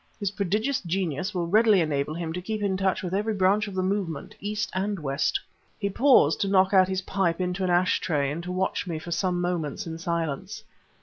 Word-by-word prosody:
His 200 -3 -1
prodigious 215 +8 0
genius 180 -1 -2
will 180 -4 -2
readily 215 +3 +4
enable 150 -2 -1
him 165 -1 -4
to 180 - -4
keep 215 +3 -3
in 195 -2 +1
touch 190 0 0
with 180 0 -4
every 210 +2 0
branch 200 +2 +2
of 200 - -7
the 185 - 0
movement, 185 -6 -2
East 210 +1 -3
and 200 +2 -1
West." 145 - 0 0.4
He 200 -1 -2
paused 230 - +4
to 200 - +1
knock 190 0 +3
out 185 -1 +6
his 190 0 -2
pipe 185 -3 0
into 180 +1 -1
an 185 - 0
ashtray 170 -5 +1
and 160 +3 -4
to 180 +1 -6
watch 185 +1 -1
me 165 -3 -3
for 165 +2 -8
some 180 +1 0
moments 175 +1 -2
in 165 -1 -6
silence. 170 +5 -3
185 Hz, 210 wpm, -26 LUFS, 170-200 Hz, 0.4 s, out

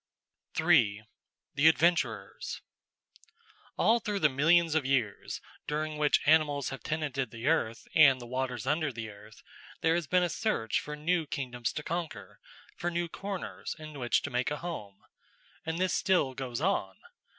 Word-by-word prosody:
§ - - -38
3 125 -11 +4 0.5
The 145 +1 +4
Adventurers 170 +2 +1 1.2
All 230 +2 +4
through 210 -2 -2
the 155 -6 +4
millions 165 +4 +4
of 160 -2 +2
years 130 -7 -1 0.3
during 155 +1 -2
which 150 -1 +3
animals 145 -3 +3
have 135 - -7
tenanted 140 -5 -2
the 115 +2 -8
earth 140 -7 0
and 135 -4 +7
the 120 - -8
waters 125 -2 -3
under 150 +1 +1
the 115 -3 -6
earth, 105 +1 -15 0.4
there 160 - +3
has 170 -2 -1
been 180 +2 +3
a - - +2
search 200 - 0
for 150 - -6
new 160 +1 0
kingdoms 125 -4 -3
to 150 - -4
conquer, 170 - -5 0.4
for 175 - -2
new 175 0 -1
corners 195 +3 -5
in 155 -2 -9
which 120 -1 +1
to - - -4
make 125 +1 0
a 150 - -3
home. 105 - -7 0.6
And 160 0 -1
this 185 +1 +1
still 175 -8 +2
goes 130 -1 -4
on. 195 +4 0
150 Hz, 160 wpm, -30 LUFS, 125-170 Hz, 1.2 s, and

